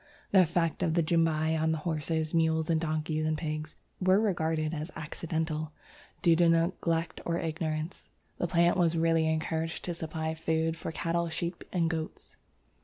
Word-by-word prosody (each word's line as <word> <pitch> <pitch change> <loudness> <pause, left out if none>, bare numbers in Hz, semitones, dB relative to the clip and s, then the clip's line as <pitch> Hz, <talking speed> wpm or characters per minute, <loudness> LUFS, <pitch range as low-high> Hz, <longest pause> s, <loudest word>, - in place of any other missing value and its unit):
The 190 - +7
effects 170 -1 +1
of 165 -1 +1
the 170 - +3
Jumbai 160 -1 +2
on 160 0 +2
horses, 160 0 -2
mules, 160 -1 +2
donkeys, 155 -1 0
and 155 0 0
pigs 155 -1 -4 0.2
were 185 +1 +4
regarded 160 -6 0
as 155 +1 -4
accidental 155 0 -3 0.5
due 170 -1 +6
to 170 -1 +5
neglect 165 0 +1
or 170 0 -1
ignorance. 160 0 -3 0.3
The 175 - 0
plant 170 +1 +3
was 170 -2 +3
really 165 -1 +3
encouraged 160 +1 -2
to 175 - -2
supply 160 -1 -3
food 160 0 0
for 165 - -5
cattle, 170 +1 -1
sheep, 170 +2 -4
and 170 -3 +1
goats. 160 -1 -5
160 Hz, 155 wpm, -30 LUFS, 155-170 Hz, 0.5 s, The